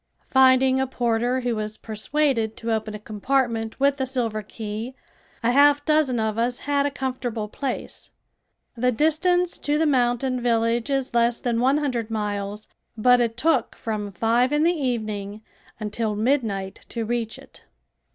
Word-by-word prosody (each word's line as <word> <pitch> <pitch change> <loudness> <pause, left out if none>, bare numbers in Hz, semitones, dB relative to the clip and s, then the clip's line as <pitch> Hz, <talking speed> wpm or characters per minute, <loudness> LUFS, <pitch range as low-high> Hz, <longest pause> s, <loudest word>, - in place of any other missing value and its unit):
Finding 260 0 +5
a 265 - +1
porter 245 0 0
who 245 -2 -1
was 215 0 -4
persuaded 225 0 -1
to 230 0 -3
open 215 -1 -3
a - - -7
compartment 225 +1 -1
with 280 0 +2
a 260 - 0
silver 235 -5 -1
key 220 +4 -6 0.5
a 235 - +3
half 290 +2 +5
dozen 305 -6 +2
of 220 0 -1
us 240 +1 0
had 285 0 +2
a - - 0
comfortable 250 -5 -3
place. 265 +4 -5 0.7
The 250 +2 +1
distance 340 +6 +2
to 290 +1 0
the 320 - +2
mountain 255 -2 +1
village 230 +1 +1
is 270 -2 -1
less 235 0 +2
than 235 -2 -1
one 265 +4 +3
hundred 250 -7 -2
miles, 210 -1 -3 0.3
but 245 +2 +5
it 230 -1 -1
took 320 +6 +1
from 210 -2 -4
five 230 +6 +2
in 295 +1 +2
the 340 +2 +4
evening 215 - -3 0.4
until 215 0 -2
midnight 210 -5 -1
to 230 -2 -3
reach 230 -1 -2
it. - - -17
240 Hz, 160 wpm, -24 LUFS, 220-265 Hz, 0.7 s, Finding